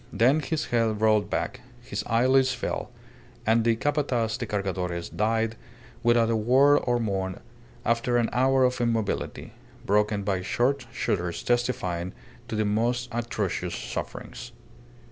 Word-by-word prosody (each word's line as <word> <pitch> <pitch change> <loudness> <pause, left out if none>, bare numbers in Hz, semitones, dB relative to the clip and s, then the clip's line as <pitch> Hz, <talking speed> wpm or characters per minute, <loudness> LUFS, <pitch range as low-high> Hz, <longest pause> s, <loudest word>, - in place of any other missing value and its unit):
Then 125 +9 +4
his 155 +1 -2
head 115 -3 +2
rolled 110 -1 +3
back, - - -2 0.2
his 120 - -5
eyelids 130 +3 +4
fell, 120 - -3 0.6
and 115 +1 +3
the 115 0 +3
Capataz 125 -4 0
de 120 - -4
Cargadores 90 -4 -2
died 110 +1 0 0.4
without 120 -1 +3
a - - +2
word 130 +6 +5
or 120 -1 +2
moan 95 -4 -2 0.5
after 115 +1 +2
an 120 -1 +2
hour 130 +2 +3
of 125 0 +1
immobility, 115 -3 -2 0.3
broken 105 0 +2
by 95 -2 0
short 125 +6 0
shudders 90 -3 -2
testifying 95 -8 -1 0.3
to - - -4
the 110 0 +1
most 120 +4 0
atrocious 120 0 -2
sufferings. - - -6
115 Hz, 135 wpm, -26 LUFS, 105-125 Hz, 0.6 s, word